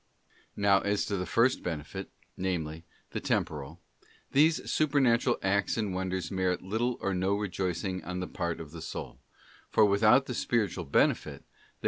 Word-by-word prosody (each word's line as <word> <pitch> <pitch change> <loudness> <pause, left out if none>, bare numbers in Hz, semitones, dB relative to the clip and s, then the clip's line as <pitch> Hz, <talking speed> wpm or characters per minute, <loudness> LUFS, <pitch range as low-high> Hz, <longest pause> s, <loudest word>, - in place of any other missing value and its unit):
ial - - -40 0.3
Now 100 -1 +6
as 100 +1 0
to 100 - -2
the 90 -2 -3
first 120 +8 +3
benefit, 80 -4 -5 0.3
namely, 85 -3 -3 0.3
the - - -3
temporal: 75 +3 -2 0.5
these 155 +4 +4
inlovingGod - - -12
supernatural 130 -5 +3
acts 100 +3 +1
and 105 -4 -1
wonders 95 -2 -2
merit 95 -2 0
little 115 +6 -1
or 100 - 0
no 95 +2 +1
rejoicing 95 -1 -2
on 90 +3 -5
young - - -2
the 90 - -3
part 85 -1 -3
of 80 -3 -8
the 85 0 -8
soul, - - -6 0.5
for 110 - +5
without 110 +6 +5
the 125 - -4
spiritual 115 -5 0
benefit, 70 - +1
they - - -33
95 Hz, 170 wpm, -29 LUFS, 90-110 Hz, 0.5 s, Now